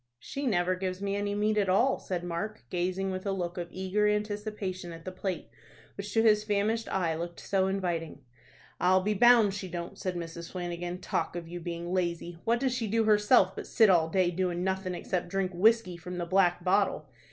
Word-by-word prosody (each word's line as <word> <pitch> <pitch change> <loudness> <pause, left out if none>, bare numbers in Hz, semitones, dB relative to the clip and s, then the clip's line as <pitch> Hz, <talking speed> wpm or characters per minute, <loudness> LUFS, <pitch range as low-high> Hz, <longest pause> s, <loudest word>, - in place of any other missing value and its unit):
"She 275 - -5
never 180 -4 +2
gives 185 0 -3
me 200 0 -2
any 205 0 -1
meat 210 +1 +1
at 195 -2 +1
all," 240 +9 +3
said 180 -2 -4
Mark, 175 +5 -4
gazing 185 +2 -1
with 185 0 -4
a - - +1
look 180 -2 -3
of 175 - -4
eager 190 +4 0
anticipation 210 -3 -2
at 165 0 -10
the 185 - -4
plate 185 -2 -4 0.4
which 200 0 -6
to 225 - +4
his 210 -2 +5
famished 215 +2 0
eye 175 -4 0
looked 170 +1 -5
so 190 -1 +1
inviting. 175 -6 -2 0.6
"I'll 185 +2 +4
be 210 +2 +1
bound 230 -1 +6
she 195 -1 -5
don't," 170 -1 -6
said 185 -1 -3
Mrs. 170 0 -6
Flanagan. 175 0 -4
"Talk 180 - -2
of 170 -1 -5
you 175 +1 -6
being 170 +1 -5
lazy! 170 -2 -2
What 235 +1 +2
does 260 -1 0
she 240 -3 -2
do 225 +2 +2
herself 210 -2 +4
but - - -6
sit 220 -4 +5
all 165 -3 +3
day 180 0 +2
doing 180 0 -1
nothin' 190 -1 -1
except 175 0 -2
drink 195 0 -1
whiskey 195 -1 +3
from 180 +2 -7
the 175 - -2
black 175 -1 +2
bottle! 190 -5 +1
185 Hz, 205 wpm, -29 LUFS, 175-205 Hz, 0.6 s, bound